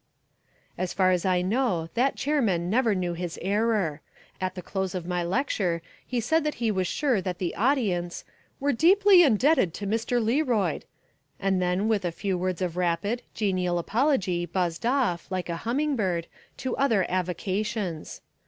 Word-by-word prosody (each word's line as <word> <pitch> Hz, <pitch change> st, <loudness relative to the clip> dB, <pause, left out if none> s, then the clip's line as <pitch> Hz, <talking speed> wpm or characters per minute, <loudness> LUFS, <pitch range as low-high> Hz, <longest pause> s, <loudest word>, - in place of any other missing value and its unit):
As 185 Hz, -1 st, -2 dB
far 185 Hz, -1 st, +3 dB
as 180 Hz, -1 st, 0 dB
I 180 Hz, -1 st, +2 dB
know 190 Hz, -6 st, 0 dB
that 260 Hz, +3 st, +1 dB
chairman 220 Hz, -, 0 dB
never 230 Hz, -2 st, +3 dB
knew 180 Hz, -2 st, -1 dB
his 170 Hz, -1 st, -5 dB
error. 200 Hz, -5 st, 0 dB, 0.4 s
At 185 Hz, 0 st, -2 dB
the 180 Hz, -, -7 dB
close 190 Hz, 0 st, -3 dB
of 180 Hz, -2 st, -4 dB
my 180 Hz, 0 st, -1 dB
lecture 180 Hz, -, -1 dB, 0.2 s
he 250 Hz, -, -2 dB
said 320 Hz, +8 st, +1 dB
that 300 Hz, 0 st, -1 dB
he 230 Hz, -2 st, 0 dB
was 185 Hz, -3 st, 0 dB
sure 260 Hz, -5 st, +1 dB
that 180 Hz, -2 st, -3 dB
the 175 Hz, -2 st, -2 dB
audience 200 Hz, -9 st, 0 dB, 0.4 s
"were 285 Hz, +1 st, +1 dB
deeply 380 Hz, -, +6 dB
indebted 260 Hz, -, +3 dB
to 205 Hz, -, -5 dB
Mr. 230 Hz, +4 st, 0 dB
Learoyd," 230 Hz, -, +1 dB, 0.5 s
and 190 Hz, -1 st, +1 dB
then 180 Hz, +3 st, +1 dB
with 215 Hz, -3 st, +1 dB
a 175 Hz, -, -1 dB
few 190 Hz, +3 st, -2 dB
words 185 Hz, 0 st, -2 dB
of 175 Hz, -1 st, -3 dB
rapid, 180 Hz, +7 st, 0 dB
genial 185 Hz, -4 st, 0 dB
apology 190 Hz, -, +1 dB
buzzed 175 Hz, +3 st, -1 dB
off, 245 Hz, -10 st, 0 dB
like 185 Hz, -2 st, -3 dB
a 170 Hz, -, -2 dB
humming 290 Hz, +4 st, +1 dB
bird, 180 Hz, -7 st, -1 dB, 0.3 s
to 260 Hz, -, -3 dB
other 225 Hz, -9 st, +2 dB
avocations. 185 Hz, 0 st, -3 dB
195 Hz, 165 wpm, -26 LUFS, 180-240 Hz, 0.5 s, deeply